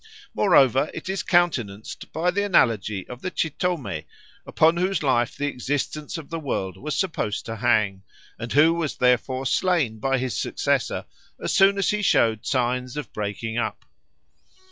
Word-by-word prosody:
Moreover, 135 - +4
it 190 - -6
is 190 0 -1
countenanced 120 - 0
by 170 +3 0
the 200 +3 0
analogy 110 - +1
of 125 +1 -9
the - - -3
Chitomé, 155 - -2 0.4
upon 165 +2 +3
whose 185 -1 0
life 125 -3 +1
the 145 - -1
existence 145 +3 -3
of 160 -2 -10
the 165 - -3
world 95 - -3
was 150 +9 -4
supposed 165 - -2
to 115 0 -5
hang, 110 -5 +1 0.4
and 115 +1 -5
who 155 +3 +5
was 165 -4 -2
therefore 125 +1 +1
slain 150 -9 +1
by 135 +4 +1
his 130 -1 -2
successor - - -1 0.3
as - - -2
soon 195 +1 +5
as 200 - +2
he 210 0 -1
showed 110 - +2
signs 125 0 -1
of 150 - -6
breaking 110 +2 -3
up. - - -3
135 Hz, 160 wpm, -24 LUFS, 115-170 Hz, 0.4 s, who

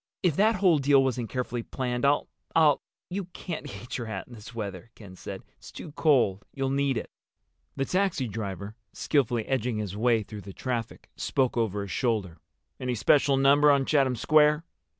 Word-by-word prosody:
If 175 -6 +2
that 220 +5 +4
whole 180 -5 +4
deal 140 0 +5
wasn't 125 -3 -1
carefully 125 -2 -3
planned 125 +1 -2
I'll—I'll—" 145 +1 +2 0.3
"You 195 +1 -3
can't 170 -4 -6
eat 100 +6 -6
your 120 - -5
hat 100 -4 -5
in 125 - -13
this 115 +1 -11
weather," 100 -1 -6
Ken 100 -4 -12
said. - - -8 0.2
"It's - - -12
too - - -9
cold. 130 - +2
You'll 135 -1 -1
need 140 -2 +1
it." - - -5 0.6
The 135 - -1
taxi 185 -8 0
driver, 100 -1 -5 0.2
skillfully 120 -6 0
edging 125 -3 -1
his 105 -3 -4
way 115 0 +2
through 105 0 -9
the 100 0 -10
traffic, 120 -1 -4
spoke 130 -3 0
over 105 -4 0
his 100 - -7
shoulder. 105 - -1 0.4
"Any 125 -1 -2
special 140 +4 +3
number 140 +2 +5
on 140 -2 +4
Chatham 135 -4 +2
Square?" 150 +4 +4
125 Hz, 175 wpm, -27 LUFS, 110-145 Hz, 0.6 s, deal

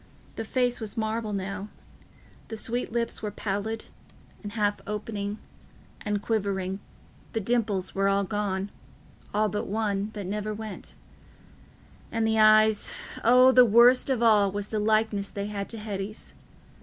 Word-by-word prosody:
The 225 - -3
face 245 +1 0
was 220 +1 -5
marble 220 0 -1
now; 195 0 -4 0.8
the 225 - -5
sweet 235 +3 -2
lips 235 0 -2
were 210 - -2
pallid 205 +2 -3 0.6
and 205 -1 -7
half 205 -2 0
open 210 -1 -3 0.7
and 210 -1 -1
quivering; 195 -3 -1 0.5
the 225 - 0
dimples 215 -4 -1
were 195 0 +1
all 200 0 +2
gone—all 205 +1 -4
but 210 +1 -3
one, 205 -1 -1
that 205 -3 -5
never 210 +2 -3
went; 215 -2 -8 1.2
and 225 -1 0
the 220 0 +2
eyes—O, 220 +3 +4
the 255 -1 +8
worst 240 +4 +6
of 250 -3 +1
all 210 -4 +5
was 205 +1 -4
the 215 - -1
likeness 215 -1 +1
they 200 0 -4
had 205 -1 -4
to 230 - -5
Hetty's. 210 -1 -5
210 Hz, 140 wpm, -27 LUFS, 200-225 Hz, 1.2 s, the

